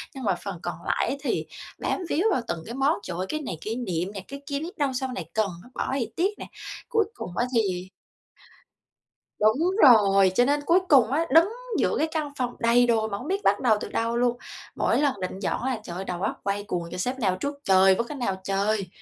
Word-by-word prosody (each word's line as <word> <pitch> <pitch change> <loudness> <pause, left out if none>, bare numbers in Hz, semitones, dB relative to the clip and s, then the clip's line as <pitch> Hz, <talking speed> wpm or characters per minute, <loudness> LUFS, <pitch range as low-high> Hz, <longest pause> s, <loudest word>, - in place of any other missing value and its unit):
nhưng 265 - -7
mà 195 -5 +2
phần 195 -4 -5
còn 175 -2 -3
lại - - +1
á - - -1
thì 290 - -1 0.3
bám - - -1
víu 325 - +1
vào 255 - +1
từng 165 -6 -3
cái 235 - -6
món: 275 +3 +2
"Trời 175 -1 -5
ơi 185 - -1
cái 310 - -2
này 220 - -5
kỷ 220 +2 -3
niệm 185 -6 -2
nè, 195 - -5
cái 280 0 -8
kia 280 -1 -2
biết 345 +7 -7
đâu 285 -3 +1
sau 260 +1 -2
này - - -4
cần 215 -2 +1
nó, 245 - -16
bỏ - - -2
thì 270 -4 -1
tiếc 390 +4 0
nè." - - -6 0.4
Cuối 450 -3 +2
cùng 180 - -7
á 240 - +2
thì 185 -5 0 1.5
Đúng 265 - +3
rồi, 195 -6 +6
cho 245 - +5
nên 290 +1 +1
cuối 340 +5 +4
cùng 260 -5 +6
á, 320 +4 +1
đứng 325 +4 +7 0.3
giữa - - +1
cái 315 - +1
căn 305 -3 -2
phòng 245 -1 -1
đầy 240 +1 +4
đồ 225 -2 +2
mà 200 -2 -3
hông 255 - -8
biết 390 +3 -1
bắt 200 - +3
đầu 225 -4 +3
từ - - -5
đâu 230 +1 -1
luôn. 245 0 +1 0.4
Mỗi - - +1
lần 270 -9 0
định 185 +1 -4
dọn 195 - -2
á 260 - 0
là 225 - -4
trời 175 -4 -7
ơi, 190 - -5
đầu 180 -1 -4
óc 200 - -2
quay 200 +1 -1
cuồng: 180 -4 -3
"Trời, 180 - -5
xếp 250 +7 -2
nào 190 -6 +1
trước 285 +9 -3
trời 190 0 +5
với 235 - -1
cái 295 - -6
nào 235 -7 -1
trời!" 195 0 0
235 Hz, 250 wpm, -26 LUFS, 195-280 Hz, 1.5 s, đứng